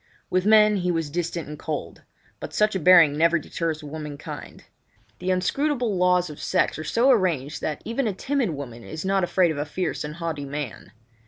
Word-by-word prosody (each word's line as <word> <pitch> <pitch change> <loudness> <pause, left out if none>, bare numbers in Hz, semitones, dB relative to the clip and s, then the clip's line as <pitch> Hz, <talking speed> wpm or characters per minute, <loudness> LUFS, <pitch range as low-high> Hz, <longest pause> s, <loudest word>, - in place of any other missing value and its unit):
With 185 +2 +1
men 215 -1 +6
he 180 -1 -1
was 165 -4 -1
distant 170 0 -3
and 150 0 -8
cold; 145 - -5 0.4
but - - -7
such 210 0 +3
a - - +1
bearing 165 -4 +7
never 170 +2 +3
deters 155 0 -3
womankind. 150 -1 -8 0.6
The 180 - -3
inscrutable 240 +5 0
laws 180 0 +3
of 150 -2 -10
sex - - +1
have 155 0 -6
so 250 +4 +4
arranged 165 - 0
that 150 - -3
even 235 +2 -1
a 210 - -1
timid 265 +2 -1
woman 130 -6 -7
is 155 +7 -7
not 195 0 +2
afraid 175 -1 +2
of 150 - -4
a - - 0
fierce 180 +4 -3
and 150 0 -6
haughty 165 -4 -4
man. 140 -4 -6
170 Hz, 190 wpm, -24 LUFS, 150-190 Hz, 0.6 s, bearing